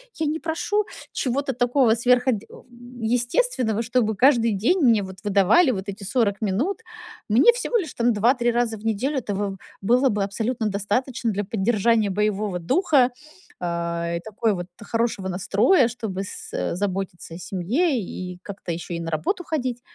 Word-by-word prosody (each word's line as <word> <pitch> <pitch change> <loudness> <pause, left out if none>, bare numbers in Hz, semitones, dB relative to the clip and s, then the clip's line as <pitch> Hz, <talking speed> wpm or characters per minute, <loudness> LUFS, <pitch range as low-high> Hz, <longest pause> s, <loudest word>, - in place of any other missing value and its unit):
я 315 - -2
не 305 +2 -1
прошу 370 +6 -1 0.3
чего-то 270 +1 -1
такого 245 -1 +3
сверх 245 +2 +3
отд 225 -5 +1
о - - -14
в 245 0 -14
естественного, 240 - +1
чтобы 225 -2 +1
каждый 235 -1 +4
день 235 - +2
мне, 230 - +4
вот, 190 0 -9
выдавали 205 - +4
вот 190 -3 -4
эти 200 +1 -7
40 205 -1 0
минут. 230 - 0 0.5
Мне 245 - +6
всего 485 0 0
лишь 335 - -3
там 235 0 +2
2-3 240 +3 +2
раза 235 -1 0
в 210 - -13
неделю 245 +7 0
этого 205 -3 -3 0.2
было 245 +6 +3
бы 205 -3 0
абсолютно 220 +3 -2
достаточно 225 +4 -1
для 205 +1 -2
поддержания 220 +1 +1
боевого 205 -1 -1
духа. 265 - +3 0.5
Э, 170 -1 -2
и - - -4
такой 220 +2 -1
вот 175 -2 -5
хорошего 230 -4 -1
настроя, 210 - +3
чтобы 220 -5 -4
с 195 - -7
э, - - -2
заботиться 190 -3 -3
о - - -7
семье 240 - 0
и 180 -1 -7
как-то 195 -3 -6
ещё 170 +1 -5
и - - -3
на 165 0 -5
работу 260 - -1
ходить. 255 -7 -2
225 Hz, 170 wpm, -23 LUFS, 195-255 Hz, 0.5 s, Мне